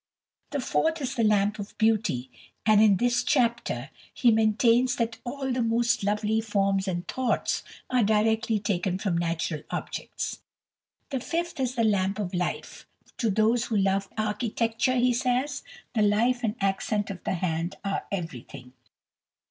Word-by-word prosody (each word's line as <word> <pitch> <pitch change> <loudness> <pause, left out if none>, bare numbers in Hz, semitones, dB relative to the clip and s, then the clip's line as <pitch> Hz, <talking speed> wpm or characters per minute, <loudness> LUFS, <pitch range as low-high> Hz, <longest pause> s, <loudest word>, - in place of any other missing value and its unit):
The 285 - -2
fourth 320 +5 0
is 270 -2 -3
the 235 - 0
Lamp 210 0 +2
of 205 - -8
Beauty, 215 - +1 0.3
and 215 -1 +6
in 205 -3 +6
this 240 +2 +2
chapter 235 - 0 0.2
he 240 - +3
maintains 230 +3 +3
that 230 -1 -2
"all 265 +2 -3
the 250 0 0
most 230 -1 +1
lovely 210 +2 +1
forms 195 -2 0
and 175 -1 -3
thoughts" 260 -2 0 0.3
are 255 -1 +2
directly 220 +1 +2
taken 190 -3 -1
from 190 -3 -1
natural 165 -2 -1
objects. - - -4 0.7
The 270 - -1
fifth 340 +4 -3
is 255 -1 -1
the 230 - +1
Lamp 200 -2 +1
of 195 -4 -3
Life. 180 -1 -3 0.3
"To 230 - +1
those 220 +4 +2
who 220 - -1
love 195 0 +1
architecture," 225 +3 0
he 250 0 +3
says, 255 +3 0 0.3
"the 220 - +1
life 230 +5 +2
and 220 -1 0
accent 200 +1 0
of 185 - -9
the - - -1
hand 165 -1 -2
are 195 -1 -2
everything." 140 -8 -6
215 Hz, 155 wpm, -27 LUFS, 195-240 Hz, 0.7 s, and